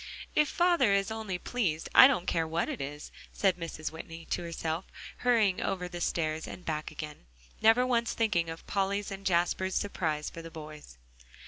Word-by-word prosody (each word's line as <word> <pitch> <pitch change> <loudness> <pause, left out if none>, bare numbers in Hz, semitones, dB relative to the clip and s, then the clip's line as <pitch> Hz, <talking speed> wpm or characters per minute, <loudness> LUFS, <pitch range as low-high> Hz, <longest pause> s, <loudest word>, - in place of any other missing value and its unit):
"If 300 -1 +3
father 345 - +3
is 200 +2 +1
only 220 -4 -3
pleased, 175 -6 -1
I - - +11
don't 240 -10 0
care 165 -3 0
what 165 +2 -1
it - - -4
is," 145 +2 -6 0.2
said 195 -3 +2
Mrs. 165 -3 -5
Whitney 165 +1 -9
to - - 0
herself, 165 0 -3 0.3
hurrying 225 -6 +3
over 185 -2 -2
the 175 -1 -7
stairs 160 -2 -1
and 180 - -9
back 155 -1 -2
again, 150 - -8 0.3
never 225 +3 +6
once 235 -2 +1
thinking 190 -8 +1
of 165 0 -8
Polly's 200 +1 -1
and 195 0 -6
Jasper's 185 +1 +1
surprise 160 -7 -1
for 165 - -7
the 165 - -9
boys. 150 - -10
175 Hz, 180 wpm, -30 LUFS, 160-205 Hz, 0.3 s, I